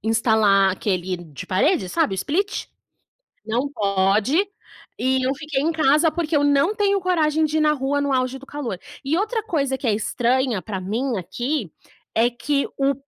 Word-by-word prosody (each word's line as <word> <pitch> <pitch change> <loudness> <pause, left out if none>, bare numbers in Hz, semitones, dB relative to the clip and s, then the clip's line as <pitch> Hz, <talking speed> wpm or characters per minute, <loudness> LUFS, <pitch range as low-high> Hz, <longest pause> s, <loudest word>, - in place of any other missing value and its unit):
instalar 220 -3 +3
aquele 185 -1 -2
de 155 -6 -10
parede, 195 - +1
sabe? 190 +2 +1
O - - -5
Split. 380 - -2 0.8
Não 240 +6 -1
pode 205 - +2 0.5
e 260 +1 +1
eu 265 - +2
fiquei 290 -2 -2
em 325 - +1
casa 310 +1 +3
porque 330 -2 -1
eu 290 - +3
não 285 +8 +3
tenho 400 -1 +1
coragem 320 -4 +1
de 310 +1 0
ir - - +2
na 305 0 +4
rua 285 0 -1
no 285 -1 0
auge 255 0 0
do 275 - -14
calor. 265 -11 -5 0.3
E 295 +4 +1
outra 435 +4 -1
coisa 280 -10 -1
que 265 - -4
é 220 - +3
estranha 240 +1 0
pra 195 -2 -5
mim 230 +7 -2
aqui, 235 - -3 0.4
é 230 +2 +4
que 280 +4 -1
o 275 0 +2
270 Hz, 180 wpm, -22 LUFS, 215-305 Hz, 0.8 s, na